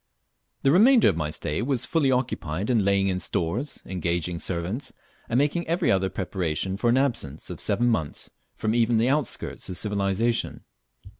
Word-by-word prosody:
The 135 - +4
remainder 225 - +6
of 95 - 0
my 75 -2 -2
stay 75 0 -2
was 130 0 0
fully 150 -3 +1
occupied 115 -7 -1
in 115 -4 +3
laying 100 0 +2
in 95 -1 0
stores, 100 - -2
engaging 85 -2 -2
servants, 90 +11 -3 0.4
and 115 - +1
making 150 +5 +1
every 170 +2 +1
other 95 0 +2
preparation 95 -1 -2
for 120 +4 +1
an 120 - +4
absence 115 - -1
of - - -7
seven 120 - +1
months 110 -11 -1 0.2
from 110 - -1
even 115 0 +3
the 115 +3 +3
outskirts 145 -3 -2
of 90 - -2
civilization. 105 +3 0
105 Hz, 165 wpm, -25 LUFS, 90-130 Hz, 0.4 s, remainder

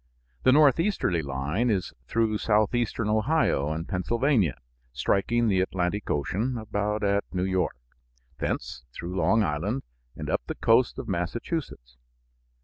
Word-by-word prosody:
The 130 - +5
northeasterly 145 - +3
line 70 - -1
is 95 -5 -1
through 110 -2 +1
southeastern 110 +1 +1
Ohio 110 - +2
and 80 +2 -4
Pennsylvania, 105 - +1 0.3
striking 100 - +1
the 95 -3 +3
Atlantic 95 +2 -1
Ocean 105 - -1
about 105 -1 -2
at 100 0 +2
New 90 -1 -1
York, 95 -7 0 0.6
thence - - -3
through 85 +7 -6
Long 100 +6 +3
Island 95 - -1 0.3
and - - -6
up - - 0
the - - -3
coast 115 +2 +3
of 135 -3 -6
Massachusetts. 90 - -4
105 Hz, 130 wpm, -27 LUFS, 85-120 Hz, 0.6 s, The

